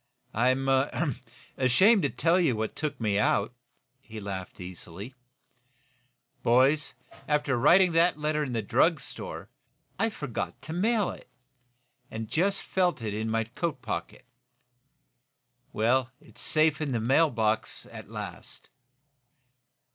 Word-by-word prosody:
"I'm 130 +4 +2 0.9
ashamed 185 - +5
to - - +1
tell 170 +2 +2
you 160 -9 +2
what 110 0 -3
took 150 -1 -3
me 105 -3 +1
out," 105 +2 +1 0.5
he 110 -4 -10
laughed, 95 -3 -6
easily. 90 +5 -8 1.3
"Boys, 135 +5 +3 0.3
after 150 -3 +1
writing 170 +9 +5
that 165 0 +3
letter 150 0 0
in 135 - -4
the 115 -2 -1
drug - - +3
store, - - -7 0.5
I 225 +2 +2
forgot 145 - -5
to 160 - -6
mail 210 +3 +1
it, - - -12 0.8
and 110 0 -5
just 195 - +1
felt 180 -9 0
it 105 -2 -2
in 110 +1 -2
my 115 0 +1
coat 150 +8 -4
pocket. - - -5 1.5
Well, 120 +3 +2
it's - - -11
safe 155 0 +2
in 145 -4 -1
the 115 - 0
mail 135 +8 +4
box, 110 -3 -1
at - - -10
last." - - -7
130 Hz, 130 wpm, -28 LUFS, 110-160 Hz, 1.5 s, ashamed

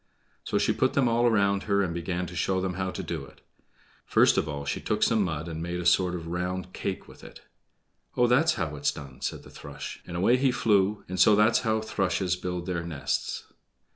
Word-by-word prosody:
So - - -1
she - - +2
put - - +1
them 135 -3 +3
all 120 +1 +3
around 100 -3 +2
her 100 0 +3
and 85 -3 -2
began 85 +1 -2
to 90 0 -9
show 95 +2 0
them 95 -1 -2
how 95 +1 -2
to 95 - -5
do 85 -4 -4
it. 65 - -16 0.6
First - - +4
of 75 - 0
all 70 -1 -5
she 70 - -2
took 105 -1 0
some 115 -2 +3
mud 80 -4 -2
and 80 -1 -5
made 85 +1 -3
a 90 - -5
sort 90 +1 +3
of 85 -2 -6
round 90 +2 -3
cake 95 - -4
with - - -15
it. - - -12 0.8
"Oh, 125 - +5
that's 130 +7 +3
how 75 -2 -3
it's 75 0 0
done," 70 -3 -11
said - - -4
the - - -14
thrush; - - -8
and 85 - -5
away 115 +8 +4
it 135 -1 +3
flew, 105 -2 +2
and 95 0 -4
so 105 +4 +7
that's 105 +3 +4
how 110 -2 0
thrushes 95 -4 0
build 90 -1 -4
their 90 -2 -2
nests. 80 -5 -3
90 Hz, 225 wpm, -27 LUFS, 85-105 Hz, 0.8 s, so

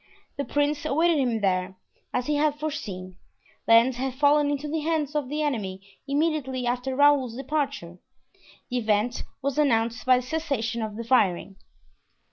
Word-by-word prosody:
The 280 - -3
prince 290 0 0
awaited 315 +2 +2
him 240 -5 0
there. 185 -1 0 0.4
As 250 - -1
he 295 0 0
had 295 0 +1
foreseen, 195 - -5 0.5
Lens 230 +2 +5
had 260 0 -3
fallen 290 +1 +3
into 290 +1 -2
the 315 +2 -2
hands 310 -2 -1
of 295 -4 -2
the 300 +1 -1
enemy 210 -10 -2 0.3
immediately 280 -3 -1
after 250 +2 -1
Raoul's 280 -4 +4
departure. 275 - -3 0.7
The 250 - 0
event 220 +2 0 0.2
was 280 +1 -1
announced 230 -4 +1
by 255 -1 +6
the 250 - -3
cessation 260 -7 -2
of 215 -1 -4
the 230 - -5
firing. 200 -5 +1
265 Hz, 155 wpm, -26 LUFS, 230-295 Hz, 0.7 s, by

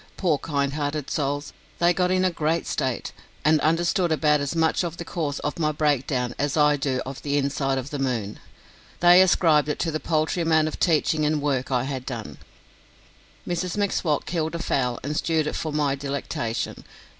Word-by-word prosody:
Poor 165 -7 +1
kind 140 -2 -1
hearted 145 -1 -3
souls, 145 0 -2 0.2
they 175 0 +3
got 180 0 +1
in 185 0 +2
a 185 - +2
great 160 0 -1
state, 130 -3 -2 0.3
and 155 -1 +4
understood 170 +2 +1
about 150 -1 +3
as 140 +3 -3
much 160 +2 +2
of 170 -1 -4
the 170 - -6
cause 150 -4 -3
of 150 - -3
my 155 -2 +2
breakdown 135 -5 0
as 145 +1 0
I 150 -1 +5
do 135 -2 -1
of 135 0 -7
the 145 0 0
inside 135 -1 0
of 130 +2 -5
the 145 - -3
moon. 120 -6 -2 0.6
They 175 +1 +7
ascribed 160 -5 +4
it 150 - -1
to 165 - -1
the 155 - -2
paltry 160 +2 0
amount 160 -1 +3
of 155 - -5
teaching 155 -2 +2
and 150 0 +1
work 140 -3 -1
I 125 -2 +1
had 130 -1 -5
done. 120 -4 -6 1.1
Mrs 175 +1 -2
M'Swat 190 -7 0
killed 160 -1 -2
a - - -1
fowl 125 -6 -1
and 145 +3 -3
stewed 160 -1 +1
it 150 - -3
for 155 - -3
my 145 -2 +1
delectation. 135 -4 -3
150 Hz, 190 wpm, -24 LUFS, 140-165 Hz, 1.1 s, They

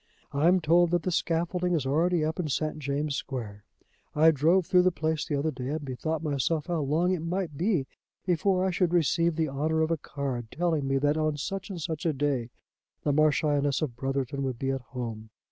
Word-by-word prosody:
I 145 +3 +2
am 180 +1 +4
told 170 +2 +4
that 175 0 +1
the 185 - -1
scaffolding 175 +2 0
is 150 -5 -1
already 160 +4 +2
up 160 +3 -3
in 170 - -1
St. 155 +2 -1
James' 140 +1 -2
Square. 110 -8 -6 0.5
I 160 +2 +6
drove 160 +5 +3
through 180 +1 +5
the 185 0 +3
place 160 -2 -2
the 150 - -1
other 150 +3 0
day, 130 -2 -6
and 150 +1 -3
bethought 155 +5 -3
myself 150 +1 0
how 175 -3 -1
long 160 +6 +1
it 185 - 0
might 170 -1 -3
be 175 -3 +1 0.4
before 185 +1 +2
I 190 - +1
should 180 -1 +1
receive 170 0 +2
the 160 -1 +1
honour 155 +4 0
of 160 - -1
a 165 - +1
card 135 -6 -4
telling 160 -3 0
me 135 0 +1
that 145 +2 +2
on 155 -1 0
such 190 +6 -4
and 185 -3 -5
such 160 0 -3
a 160 - +2
day 135 -4 -1 0.5
the 145 - +1
Marchioness 145 -1 +2
of 130 -6 -3
Brotherton 135 +1 -2
would 130 -3 -2
be 135 +2 -1
at 135 -1 -3
home. 115 -3 -6
155 Hz, 215 wpm, -28 LUFS, 140-170 Hz, 0.5 s, I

